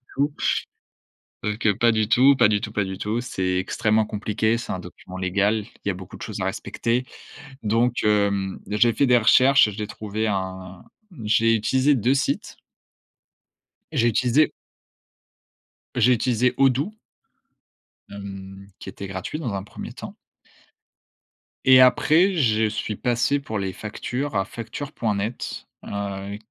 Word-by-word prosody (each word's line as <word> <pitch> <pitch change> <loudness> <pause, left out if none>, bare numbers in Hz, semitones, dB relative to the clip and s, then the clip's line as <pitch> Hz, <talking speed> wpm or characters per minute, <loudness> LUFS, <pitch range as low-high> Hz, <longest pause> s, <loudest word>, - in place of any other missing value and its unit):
tout. 145 +1 +1 1.1
Sauf 105 0 -2
que 110 - +1
que 100 - 0
pas 120 +3 +3
du 110 -1 +1
tout, 130 +4 +5
pas 105 - +5
du 105 -1 +1
tout, 105 - -6
pas 105 - 0
du 95 0 -6
tout, 110 +4 -2
c'est 95 -6 -2
extrêmement 110 +3 +1
compliqué, 110 +2 -1
c'est 120 - -5
un 95 - -3
document 90 +1 -11
légal, 100 +3 0 0.2
il - - -1
y - - +3
a - - -2
beaucoup 95 0 -10
de - - -10
choses - - -6
à - - -1
respecter, 120 +2 -2 0.6
donc 115 +3 +1
hem, 100 -2 +1
j'ai 105 +3 +3
fait 140 - +2
des 125 -1 +5
recherches, 130 +2 +5
j'ai 105 0 -5
trouvé 110 +1 -3
un 95 -2 -4 0.4
j'ai 115 +2 +3
utilisé 130 +6 +2
2 125 +3 +2
sites 140 +1 -2 1.3
j'ai 120 - +2
utilisé 125 +6 +2 1.4
j'ai 125 +1 +4
utilisé 125 +1 +1
Odoo 135 - +2 1.2
hem, 100 -1 -9
qui - - -8
était 100 +1 -8
gratuit 95 +10 -5
dans 125 -10 -3
un 95 -1 -3
1er 105 - -9
temps. - - -9 1.5
Et 130 -1 +8
après, 160 +8 +5
je 110 -7 +2
suis 110 0 -3
passé 125 +6 +1
pour 110 -7 -4
les 95 -1 -2
factures 125 +8 -4
à 95 - +1
facture.net 115 -2 -4 0.2
heu, 100 0 -5
110 Hz, 145 wpm, -23 LUFS, 100-125 Hz, 1.5 s, Et